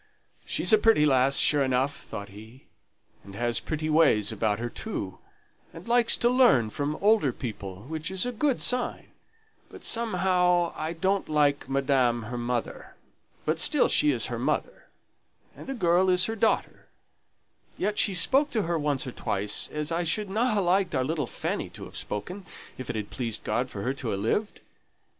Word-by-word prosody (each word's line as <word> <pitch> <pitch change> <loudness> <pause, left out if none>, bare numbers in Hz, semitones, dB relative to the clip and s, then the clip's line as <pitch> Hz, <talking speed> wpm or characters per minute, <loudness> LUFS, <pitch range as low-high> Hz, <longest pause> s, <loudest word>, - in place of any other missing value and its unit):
"She's - - +3
a 215 - +7
pretty 215 -9 +4
lass, 135 -1 +3
sure 145 -1 +4
enough," 135 +1 +1
thought 100 -6 -8
he, 110 +6 -14 0.6
"and 100 0 -12
has 120 +1 0
pretty 155 0 -4
ways 150 -10 +3
about 105 -1 0
her 120 +1 -3
too, 100 - -6 0.6
and 165 +5 -11
likes 235 0 +3
to 240 - +2
learn 240 - +4
from 145 +4 -2
older 205 - +3
people, 100 -6 -7
which 155 +4 -5
is 190 +2 -2
a 245 - -2
good 265 +2 0
sign; 250 -1 -2 0.6
but - - -13
somehow 180 -6 +1
I 155 +2 -4
don't 190 +3 -1
like 145 -3 +1
madam 130 -4 +1
her 120 +3 -6
mother; 120 0 -4 0.5
but 155 +1 0
still 295 - +4
she 300 - +3
is - - +1
her - - -4
mother, - - -2 0.7
and - - -12
the 270 - -4
girl's 180 -2 +3
her 225 - -3
daughter; 225 0 -1 0.9
yet 210 +2 -1
she 195 - +2
spoke 270 - +4
to 220 -6 -1
her 170 -1 -1
once 145 -1 -1
or 130 - -5
twice 100 -3 -1
as 150 +1 -3
I 170 +1 0
shouldn't 195 +4 -2
ha' 230 -1 +2
liked 185 -2 +1
our 130 - +1
little 150 -2 -2
Fanny - - -4
to - - -11
have - - -13
spoken, 180 - -5 0.3
if 130 - -8
it - - -3
had 105 -2 -5
pleased 115 -4 -4
God 125 +1 -1
for 100 -4 -6
her 130 - -1
to 130 -5 -4
ha' 100 - -2
lived. 160 - -2
155 Hz, 180 wpm, -27 LUFS, 120-195 Hz, 0.9 s, a